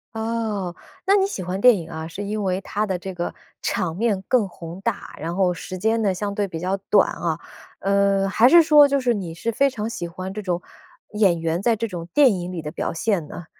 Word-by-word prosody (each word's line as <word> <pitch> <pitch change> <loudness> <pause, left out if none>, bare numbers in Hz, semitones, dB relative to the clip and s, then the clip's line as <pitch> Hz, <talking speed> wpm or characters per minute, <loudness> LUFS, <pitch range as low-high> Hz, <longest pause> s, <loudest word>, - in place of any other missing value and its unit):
哦， 220 -5 -2 0.3
那 395 +1 +5
你 390 -1 +3
喜 190 - -5
欢 185 +2 -3
电 245 -3 +7
影 165 -1 -7
啊， 160 -1 -6
是 195 +5 -6
因 210 +1 -3
为 185 0 0
它 205 +2 -2
的 190 -3 -2
这 190 +1 -7
个 175 0 -3 0.3
场 165 -2 -1
面 205 -2 0
更 245 -6 +3
宏 170 +2 -9
大， 230 0 -3
然 165 +3 -4
后 185 -2 +2
时 185 +2 -7
间 220 +4 +1
呢 195 -3 +2
相 205 +1 -3
对 205 0 -1
比 165 -3 -6
较 185 +2 -1
短 205 - +5
啊？ 165 -2 -2 0.4
呃， 195 0 +2
还 225 +5 +5
是 340 -1 +8
说 295 -2 +7
就 280 0 +1
是 245 -2 +2
你 175 -6 -5
是 230 +7 -2
非 275 +5 +3
常 220 -4 -4
喜 175 -6 -4
欢 185 +2 -6
这 210 - -5
种 180 -2 -2 0.5
演 200 -5 +3
员 165 +1 -1
在 230 +2 +3
这 230 +1 -2
种 175 -4 -6
电 275 -6 +5
影 180 -1 -4
里 175 - -5
的 150 - -5
表 - - -3
现 170 -3 -1
呢？ 175 - -9
195 Hz, 250 characters per minute, -23 LUFS, 175-225 Hz, 0.5 s, 是